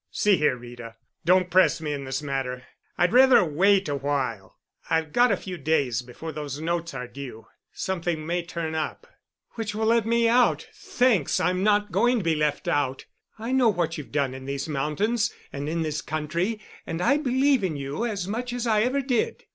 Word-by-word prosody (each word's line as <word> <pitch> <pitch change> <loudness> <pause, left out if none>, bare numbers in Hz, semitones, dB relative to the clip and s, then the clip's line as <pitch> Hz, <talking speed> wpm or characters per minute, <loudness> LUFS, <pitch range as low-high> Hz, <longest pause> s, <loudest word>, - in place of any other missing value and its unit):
"See 210 -1 +3
here, 150 -4 +2
Rita, 120 -1 -10 0.3
don't 180 0 +3
press 185 -1 +4
me 150 -2 -3
in 140 -1 -5
this 130 +2 -3
matter, 130 -3 -3 0.3
I'd 175 +3 +2
rather 255 -5 +7
wait 190 +5 +3
a 145 - -1
while. 135 -8 -3 0.3
I've 160 -2 0
got 245 0 +4
a 200 - +2
few 180 -2 -7
days 135 -6 +1
before 125 +6 -8
those 145 -2 -5
notes 170 +1 -2
are 125 - -5
due. 120 -3 -9 0.3
Something 170 -4 -3
may 175 +2 -1
turn 170 -2 -5
up——" 160 -1 -3 0.5
"Which 220 -2 -4
will 220 +1 -1
let 230 0 +3
me 235 0 +3
out—thanks, 245 - +2
I'm 180 +2 +1
not 205 0 +2
going 240 +7 +3
to 215 - -2
be 165 -1 +2
left 150 -1 -1
out. 135 -2 0 0.3
I 225 +3 -5
know 260 -3 +4
what 170 -5 -1
you've 150 - -9
done 140 -3 0
in 130 0 -9
these 140 +1 -3
mountains 160 +11 0 0.2
and 140 +1 -4
in 165 +1 -1
this 155 -1 -2
country, 170 +8 -2 0.3
and 165 - -3
I 280 +11 +3
believe 270 -3 +2
in 175 -5 -1
you 140 +7 -4
as 205 -6 -2
much 240 +4 -3
as 245 -1 -3
I 215 -2 +3
ever 255 +5 +1
did. 250 -3 -1
170 Hz, 195 wpm, -25 LUFS, 145-215 Hz, 0.5 s, rather